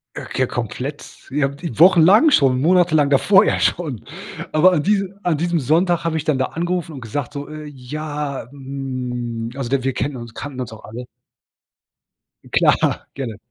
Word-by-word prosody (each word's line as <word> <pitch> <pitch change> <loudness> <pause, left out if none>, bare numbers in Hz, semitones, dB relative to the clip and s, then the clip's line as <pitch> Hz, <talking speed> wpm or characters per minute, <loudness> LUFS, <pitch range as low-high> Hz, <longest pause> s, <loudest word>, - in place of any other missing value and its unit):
Äh, - - -6
k 130 - 0
komplett. 125 +5 -4 0.3
Ja, 135 -1 +1 0.3
wochenlang 185 - +7
schon, 135 - +3
monatelang 160 -4 +3
davor 195 +9 +5
ja - - +1
schon. 150 - -1 0.5
Aber 180 +4 +5
an 150 - +1
diese 195 0 0
an 170 -4 +1
diesem 170 +1 0
Sonntag 170 +6 +2
habe 165 -1 -1
ich 150 - -2
dann 150 -4 +1
da 130 - +1
angerufen 175 0 -3
und 135 - -8
gesagt 120 +4 -4
so: 145 +1 -6
„Äh, 155 0 -8
ja, 145 0 -5
hm 125 -4 -5
also 135 -4 -4
da 135 -1 0
wir 135 -1 0
kennen 135 +4 -2
uns 120 -1 -9
kannten 135 -2 -7
uns 125 - -5
auch 110 - -12
alle“ 115 +3 -8 1.5
Klar, - - +2
gerne. 120 -7 -5
145 Hz, 170 wpm, -20 LUFS, 130-165 Hz, 1.5 s, wochenlang